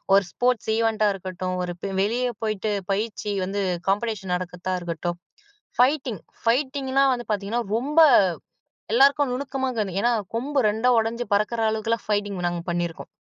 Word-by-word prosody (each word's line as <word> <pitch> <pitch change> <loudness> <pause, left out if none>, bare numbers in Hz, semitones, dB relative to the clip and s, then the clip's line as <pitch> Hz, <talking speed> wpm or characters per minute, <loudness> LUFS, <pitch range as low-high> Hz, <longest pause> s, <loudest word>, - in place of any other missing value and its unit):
ஒரு 200 - +5
ஸ்போர்ட்ஸ் 245 -3 0
ஈவென்ட்டா 220 -2 +2
இருக்கட்டும், 185 -1 -4
ஒரு 175 0 -3 0.3
வெளியே 245 +5 +1
போய்ட்டு 215 -1 -1 0.2
பயிற்சி 210 0 -2
வந்து 200 +1 -2 0.3
காம்படிஷன் 205 -3 -1
நடக்கிறதா 180 +1 -3
இருக்கட்டும், 175 0 -3 0.6
ஃபைட்டிங் 255 - +2 0.2
ஃபைட்டிங்லாம் 270 +2 +2
வந்து 240 -1 -8
பார்த்தீங்கன்னா, 210 +4 -2
ரொம்ப 290 +6 +1 0.9
எல்லோருக்கும் 275 +2 +4
நுணுக்கமா 265 0 -2
இருக்கு. 205 -6 -2
ஏனா, 240 - +3 0.3
கொம்பு 280 +4 -1
ரெண்டா 220 +4 0
உடைஞ்சு 230 +2 -2
பறக்கிற 215 +3 0
அளவுக்கெல்லாம் 220 +1 -2
ஃபைட்டிங் 205 -3 -1
நாங்க 175 -1 -2
பண்ணியிருக்கோம். 170 -1 -3
220 Hz, 130 wpm, -24 LUFS, 195-250 Hz, 0.9 s, ஒரு